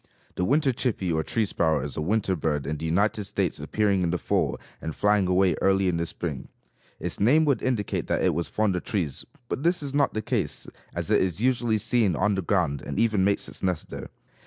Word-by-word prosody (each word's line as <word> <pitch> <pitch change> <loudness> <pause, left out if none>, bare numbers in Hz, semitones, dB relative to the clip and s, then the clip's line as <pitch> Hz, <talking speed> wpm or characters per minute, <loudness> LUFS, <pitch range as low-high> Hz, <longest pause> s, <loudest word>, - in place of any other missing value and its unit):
The - - -2
winter 140 +3 +2
chippy 110 -8 -1
or 80 - +1
tree 110 +7 0
sparrow 80 -7 +1
is 70 - -4
a - - -2
winter 95 +2 +1
bird, 75 -3 -1
in 75 +2 -2
the 80 +2 -4
United 105 +6 +1
States - - -2
appearing 100 -3 +1
in 85 - +1
the 90 - 0
fall - - 0 0.2
and 80 - -5
flying 105 -2 +3
away 90 0 +3
early 95 0 +3
in 90 -2 +1
the 85 0 -1
spring. 75 -6 -4 0.5
Its - - -4
name 145 +10 +5
would 140 -3 +2
indicate 120 -6 -1
that - - 0
it - - +3
was 85 - -1
fond 105 -3 0
of 90 - -3
trees, 90 - -2 0.2
but 125 - -3
this 170 0 +1
is 140 -1 -5
not 145 -4 +2
the 110 - -1
case, - - -2 0.3
as - - -3
it - - +5
is 90 -1 -1
usually 120 -2 +2
seen 105 -3 +2
on 105 +6 +2
the 95 - 0
ground 70 -5 0
and - - -5
even 110 -4 +3
makes 100 +1 +1
its - - -9
nest 90 -4 -1
there. - - -7
95 Hz, 230 wpm, -26 LUFS, 85-110 Hz, 0.5 s, name